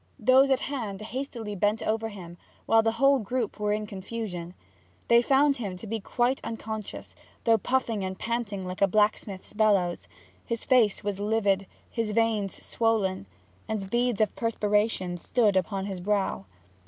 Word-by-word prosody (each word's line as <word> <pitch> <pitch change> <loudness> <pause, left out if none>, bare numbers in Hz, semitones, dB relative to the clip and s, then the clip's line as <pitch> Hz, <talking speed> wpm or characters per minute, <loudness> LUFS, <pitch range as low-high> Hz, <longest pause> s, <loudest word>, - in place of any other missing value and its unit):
Those 265 +2 +5
at 265 -1 +2
hand 225 -9 -4
hastily 230 -1 -5
bent 205 +3 +1
over 225 +1 -1
him, 175 -4 -10 0.3
and 225 0 +5
the 225 0 +1
whole 275 +3 +4
group 230 0 -3
were 210 0 0
in 210 0 -1
confusion. 190 -3 -6 0.5
They 235 0 +7
found 275 +3 +3
him 200 -6 -4
to 205 - -9
be 225 +1 -3
quite 245 +6 0
unconscious, 220 -2 -6 0.3
though 225 -1 +4
puffing 235 -4 0
and 190 0 -4
panting 225 -5 -3
like 185 +1 -6
a 200 - +6
blacksmith's 210 -1 0
bellows. 200 -5 +2 0.4
His 230 -2 -4
face 235 -6 +3
was 200 -1 -2
livid, 205 -2 +1 0.2
his 225 -2 -2
veins 220 -3 0
swollen, 205 - 0 0.4
and 200 -3 -3
beads 240 -2 +1
of 215 - +1
perspiration 210 -5 0
stood 210 +2 +2
upon 190 +1 0
his 190 -3 -5
brow. 195 - 0
215 Hz, 155 wpm, -27 LUFS, 195-230 Hz, 0.5 s, They